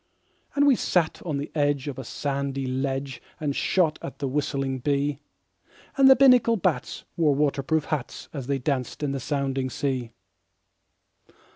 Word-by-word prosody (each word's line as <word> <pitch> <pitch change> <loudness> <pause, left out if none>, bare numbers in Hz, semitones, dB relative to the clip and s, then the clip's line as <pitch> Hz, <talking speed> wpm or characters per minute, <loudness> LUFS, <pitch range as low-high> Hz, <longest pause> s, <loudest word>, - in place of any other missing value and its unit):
And 285 0 +4
we 280 -3 +6
sat 175 -7 0
on 150 -3 -1
the 140 - -5
edge 145 -2 0
of 135 -2 -5
a - - -5
sandy 140 +1 -3
ledge 135 +1 -3 0.2
And 145 -2 -2
shot 170 -5 +1
at - - -7
the 140 - -2
whistling 135 -1 -1
bee; 145 +2 0 0.8
And 270 -1 +6
the 265 - +9
Binnacle 250 -3 +5
bats 185 - -1
wore 155 -4 +3
water 140 -1 +1
proof 155 +3 0
hats 150 -5 -4
As 135 -5 -5
they 140 -1 +1
danced 130 +1 -2
in 145 - 0
the 135 - -2
sounding 135 -1 -1
sea. 130 -3 -2
140 Hz, 160 wpm, -25 LUFS, 135-155 Hz, 0.8 s, the